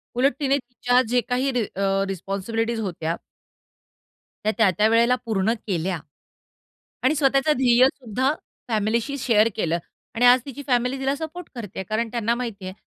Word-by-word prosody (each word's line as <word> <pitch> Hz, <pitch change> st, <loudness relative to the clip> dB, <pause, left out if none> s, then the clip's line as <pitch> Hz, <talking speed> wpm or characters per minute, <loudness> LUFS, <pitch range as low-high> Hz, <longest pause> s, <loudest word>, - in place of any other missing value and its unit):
उलट 260 Hz, +3 st, +3 dB
तिने 280 Hz, -1 st, +2 dB
तिच्या 245 Hz, -1 st, +1 dB
जे 245 Hz, 0 st, +3 dB
काही 255 Hz, +2 st, +1 dB, 0.3 s
अ, 195 Hz, 0 st, +1 dB
रिस्पॉन्सिबिलिटीज 200 Hz, +5 st, -2 dB
होत्या. 170 Hz, -5 st, -2 dB, 1.4 s
त्या, -, -, -9 dB
त्या-त्या 210 Hz, -1 st, +4 dB
वेळेला 235 Hz, +2 st, +4 dB
पूर्ण 220 Hz, -1 st, +1 dB
केल्या 180 Hz, -2 st, -1 dB, 1.0 s
आणि 270 Hz, +4 st, +3 dB
स्वतःचं 275 Hz, +1 st, +3 dB
ध्येयसुद्धा 255 Hz, +1 st, +3 dB, 0.3 s
फॅमिलीशी 230 Hz, +4 st, 0 dB
शेअर 225 Hz, -4 st, +3 dB
केलं 170 Hz, -5 st, 0 dB, 0.4 s
आणि 240 Hz, +2 st, +3 dB
आज 245 Hz, +1 st, +7 dB
तिची 280 Hz, 0 st, -7 dB
फॅमिली 250 Hz, +1 st, +1 dB
तिला 270 Hz, +1 st, 0 dB
सपोर्ट 320 Hz, +3 st, -7 dB
करतेय. 205 Hz, -5 st, -6 dB
कारण 225 Hz, +2 st, 0 dB
त्यांना 235 Hz, -1 st, 0 dB
माहिती 230 Hz, -6 st, -5 dB
आहे 185 Hz, -, -5 dB
235 Hz, 140 wpm, -23 LUFS, 210-260 Hz, 1.4 s, आज